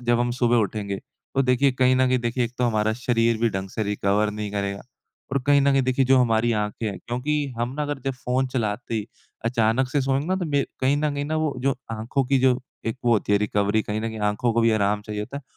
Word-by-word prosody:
जब 120 0 +2
हम 120 0 +1
सुबह 120 -1 +2
उठेंगे 105 -2 -1 0.4
तो 135 - +3
देखिए 130 +1 +3
कहीं 130 0 +3
न 130 0 +3
कहीं 130 0 +2
देखिए 120 +1 -1
एक 120 - -5
तो 125 - +2
हमारा 110 -2 +1
शरीर 115 -1 +1
भी 115 +1 +2
ढंग 95 -1 -4
से 110 - -3
रिकवर 105 0 +1
नहीं 105 0 -5
करेगा 100 -1 -2 0.5
और 140 - +2
कहीं 145 0 +5
न 140 0 +3
कहीं 135 - +3
देखिए 130 +1 +2
जो 130 0 +5
हमारी 115 -1 +2
आँखें 105 +2 -3
हैं 100 -3 -4
क्योंकि 125 +6 -2 0.2
हम 120 +2 -1
ना 150 - -1
अगर 145 -1 -3
जब 135 - 0
फ़ोन 130 +2 +1
चलाते 115 -2 -2
ही 110 -2 -2 0.4
अचानक 115 +2 +2
से 145 +3 0
सोएँगे 135 +2 0
ना 185 +2 +1
तो 185 - -2
मेर 140 -1 +1
कहीं 135 +2 +3
न 150 0 0
कहीं 145 0 -2
न 155 - -4
वो 150 - -1
जो 135 0 +1 0.2
आँखों 115 +5 -1
की 135 +1 +3
जो 130 -1 +3 0.3
एक 115 - -1
वो 120 - +4
होती 105 -1 +1
है 100 - +5
रिकवरी 105 +1 +1
कहीं 105 +1 -3
न 115 - -2
कहीं 110 -1 -6
आँखों 115 +3 0
को 115 - +2
भी 115 - +4
आराम 105 -1 +1
चाहिए 105 0 -5
होता 135 +6 -7
है 140 - -6
120 Hz, 260 wpm, -24 LUFS, 110-130 Hz, 0.5 s, कहीं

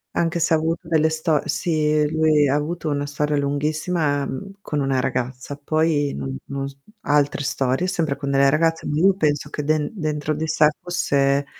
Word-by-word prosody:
Anche 170 0 0
se 165 0 +3
ha - - +3
avuto 165 +2 -2
delle 160 -1 +3
sto 160 -1 +1
sì, 155 -2 +1
lui 155 -2 +3
ha 140 - +2
avuto 155 +2 -2
una 145 -1 -1
storia 150 +1 -1
lunghissima, 145 +1 0
mhmm, 195 +10 -6
con 150 -6 -3
una 135 -2 +1
ragazza, 130 +2 -3
poi 150 0 0
non 70 -1 -4
no 140 0 -4
s 140 - -11 0.3
altre 145 -4 +1
storie, 135 +4 0
sempre 160 -5 -1
con 140 -1 -3
delle 140 0 +4
ragazze, 165 +2 +1
ma 150 - -1
io 190 +5 +5
penso 150 -4 0
che 150 - -4
den 150 0 0
dentro 155 -5 -2
di 155 +2 -3
sé 155 -1 +3 0.2
fosse 140 -5 +1
150 Hz, 185 wpm, -22 LUFS, 140-160 Hz, 0.3 s, io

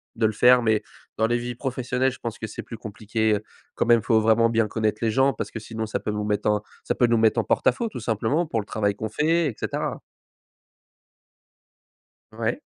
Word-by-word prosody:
de 115 - +1
le 110 - -1
faire. 125 +4 +6
Mais 110 -2 +1 0.3
dans 110 - +3
les 120 +1 +1
vies 120 0 -4
professionnelles, 130 0 -1
je 130 - -11
pense 115 -1 -5
que 110 - -5
c'est 105 - -7
plus 115 - -9
compliqué, 110 0 -1
heu, 105 - -4 0.3
quand - - 0
même 120 -1 +5
faut 110 -2 +3
vraiment 110 +1 +4
bien 115 -1 +2
connaître 110 0 -1
les 115 - +2
gens 135 +4 +3
parce - - -5
que 110 - -5
sinon 110 +1 -5
ça 110 - -3
peut - - -3
nous 105 0 -2
mettre 105 0 0
en 105 0 +1 0.2
ça - - -1
peut 120 - +3
nous 115 -1 +3
mettre 110 0 +3
en - - +1
porte - - 0
à - - +8
faux 235 - -3
tout - - -7
simplement, 115 +10 0
pour 115 -7 -2
le 100 - -4
travail 100 -1 0
qu'on 110 +1 -4
fait, 160 +6 +2
et 125 - -4
cetera. - - -3 2.3
Ouais. - - -2
115 Hz, 230 wpm, -24 LUFS, 110-125 Hz, 2.3 s, à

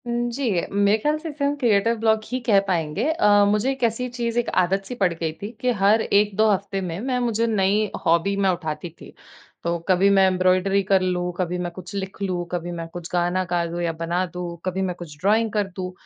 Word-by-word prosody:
उम, 240 0 -1
जी, 275 0 -2 0.3
मेरे 200 +1 +3
ख्याल 300 +7 0
से 320 +1 -6
इसे 290 -1 -3
हम 285 +1 +1
क्रिएटर 230 -4 +2
ब्लॉक 220 -1 +2
ही 255 - -1
कह 205 -4 +5
पाएँगे। 170 +2 -1
अ, 320 -10 +1 0.2
मुझे 210 +6 +1
एक 270 -2 -5
ऐसी 235 +2 0
चीज़ 240 -1 -2
एक 240 - -1
आदत 190 +2 0
सी 250 - -6
पड़ 180 -3 +3
गई 165 -1 -3
थी 205 - -4
कि 250 - +2
हर 210 +3 +5
1-2 210 +1 +2
हफ़्ते 195 0 -1
में 175 -1 -4
मैं 255 +3 -1
मुझे 230 0 0
नई 210 0 +1 0.2
हॉबी 170 +4 +2
मैं - - +4
उठाती 170 -2 -3
थी। - - -12 0.5
तो 170 0 0
कभी 190 +1 +4
मैं 195 -1 +5
एम्ब्रॉयडरी 185 +1 +2
कर 190 0 +3
लूँ, 180 -1 -1
कभी 180 -1 -1
मैं 175 -1 -3
कुछ 180 +2 -10
लिख 195 0 -5
लूँ, 180 -3 -2
कभी 175 0 -3
मैं 165 - -6
कुछ 175 -1 -7
गाना 175 +1 +1
गा 175 -1 +1
दूँ 170 +1 -4
या 170 -1 0
बना 175 +2 0
दूँ, 175 -1 -6
कभी 185 +1 -1
मैं 185 -2 -2
कुछ 155 -4 -9
ड्राइंग 215 +3 +2
कर 205 -2 0
दूँ। 185 -1 -4
195 Hz, 230 wpm, -23 LUFS, 180-220 Hz, 0.5 s, कह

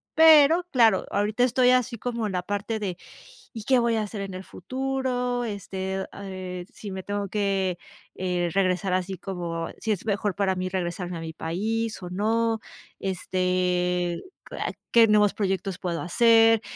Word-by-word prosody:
Pero, 320 +1 +7
claro, 225 -6 +4
ahorita 210 +4 +1
estoy 250 0 +4
así 250 -1 +2
como 235 -1 -2
en 210 - -2
la 180 -1 -1
parte 205 +4 -3
de: 190 -4 -3 0.6
"Y, 225 - -7
¿qué 260 - +4
voy 235 -1 +2
a 220 - +1
hacer 210 -1 -5
en 195 -1 -5
el 185 - -6
futuro? 255 +2 -2
Este, 190 -3 -4
eh - - -4
eh, 185 -2 -6
si 210 - -8
me 190 -1 -6
tengo 205 0 -3
que, 195 -3 0 0.4
eh, 180 -2 -1
regresar 185 -1 +1
así, 185 +1 -1
como, 170 -3 -4
si 220 - -1
es 200 - -2
mejor 205 -1 0
para 195 -2 +1
mí 185 0 -2
regresarme 180 -1 -3
a - - -6
mi 160 0 -6
país 215 +7 -2
o 180 - -6
no, 225 +4 +1 0.4
este 180 -1 0 0.3
q - - -8 0.4
¿qué 230 -1 +7
nuevos 210 -1 +4
proyectos 195 -2 -1
puedo 170 -2 -3
hacer?" 225 +3 +5
200 Hz, 170 wpm, -25 LUFS, 185-225 Hz, 0.6 s, Pero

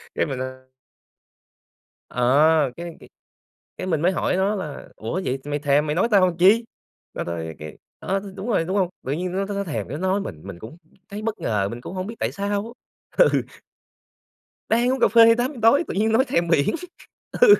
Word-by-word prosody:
cái - - +1
mình, 135 -4 -4
ơ 130 0 -6 1.4
ờ, 145 +4 +3
cái 170 -1 -7
cái - - -14 0.7
cái - - -4
mình 160 -5 0
mới 175 +3 +3
hỏi 185 - 0
nó 195 +3 +1
là 155 -8 -6
"Ủa, 140 +13 -3
vậy 130 +1 -1
mày 145 0 -2
thèm 145 +1 +2
mày 150 - -1
nói 185 - +2
tao 200 -3 +6
làm 175 -2 -3
chi?" 205 +6 +5 0.5
Nó - - -3
nói 80 -1 -5
cái 75 0 -9 0.2
ờ, 195 +1 -1
thì 200 0 -9
đúng 195 +3 -6
rồi, 210 -8 +2
đúng 190 +4 -1
hông? 185 -3 +2
Tự 130 - -3
nhiên 180 +4 -3
nó 195 +2 -1
nó 205 - -5
nó 200 - -1
thèm 115 - -4
cái 140 - -5
nói 190 +3 0
mình, 75 - -7
mình 85 - -8
cũng 115 - -10 0.3
thấy 205 +1 -6
bất 220 0 -3
ngờ, 100 -3 0
mình 120 +1 -7
cũng 125 - -8
hông 185 +1 -3
biết 225 - -7
tại - - -1
sao 205 +3 -3 0.4
á. - - +7
Ừ. - - +2 1.3
Đang 240 +3 +3
uống 265 - -2
cà - - +5
phê 230 0 +7
8:00 250 +3 -2
tối 275 +9 +5
tự - - -3
nhiên 220 +3 +1
nói 245 +4 +4
thèm 170 -10 0
biển. 150 -4 +2 0.7
Ừ. 470 -4 +9
180 Hz, 220 wpm, -23 LUFS, 140-205 Hz, 1.4 s, Ừ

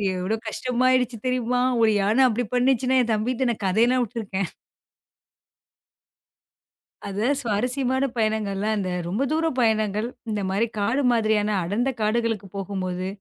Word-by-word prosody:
எவ்ளோ 185 +4 -1
கஷ்டமா 250 +3 -1
ஆயிடுச்சு 250 -2 +1
தெரியுமா? 250 0 0 0.2
ஒரு 220 -1 +5
யானை 215 +7 +3
அப்படி 240 +1 -1
பண்ணிச்சுன 260 +1 +2
என் 235 - -1
தம்பிட்ட 245 +4 0
நா - - -2
கதை 195 +5 +3
எல்லாம் 250 0 +2
உட்டுருக்கேன். 200 -5 -4 2.6
அது 200 +2 -3 0.2
சுவாரஸ்யமான 250 +4 0
பயனங்கள்லா 215 -2 0
இந்த 190 -2 -2 0.2
ரொம்ப 205 +9 -2
தூர 320 +1 +1
பயணங்கள். 215 -1 +1 0.2
இந்த 210 -1 -1
மாரி 210 +5 +1
காடு 240 +7 +1
மாதிரியான 215 -2 +1
அடர்ந்த 215 +9 0
காடுகளுக்குப் 215 -3 -1
போகுமோது 185 -1 -3
220 Hz, 125 wpm, -24 LUFS, 205-250 Hz, 2.6 s, ஒரு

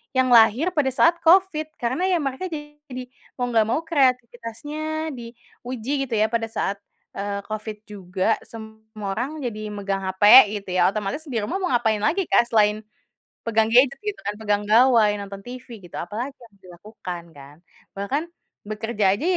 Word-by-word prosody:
yang 255 -1 +2
lahir 235 - +5
pada 295 -4 +1
saat 330 +6 +3
Covid, 335 -2 +3
karena 260 +10 -1
ya 350 -5 +1
mereka 275 +7 -3
jadi 295 -5 -8 0.3
mau 245 -1 -2
enggak 220 -2 +3
mau 310 +8 0
kreatifitasnya 290 +2 -1
diuji 240 0 -8 0.2
gitu 230 - -2
ya 215 +1 +2
pada 230 -1 -1
saat, 200 -2 -3 0.4
eee, 200 0 -3
Covid 215 0 -5
juga. 190 0 -2
Semua 220 -2 -8
orang 270 +8 -4
jadi 215 -3 -4
megang 195 -1 -2
hape 205 +3 +7
gitu 195 -2 -6
ya. 180 -1 +3
Otomatis 215 - -3
di 255 - -6
rumah 375 - -2
mau 370 - -1
ngapain 220 -3 +1
lagi, 340 - +1
Kak, 235 - +4
selain 215 -2 +3 0.7
pegang 220 0 +2
gadget 260 +3 +5
gitu 420 -1 -4
kan, 205 - -2
pegang 210 -1 -1
gawai, 230 0 +5 0.2
nonton 200 0 -8
TV 245 0 -10
gitu, 175 -3 -13
apalagi 235 +10 -5
yang 230 -4 -18
dilakukan 180 -1 -8
kan. 140 -1 -14 0.4
Bahkan 275 +12 -2 0.4
bekerja 215 -2 0
aja 275 - -7
230 Hz, 160 wpm, -23 LUFS, 210-275 Hz, 0.7 s, hape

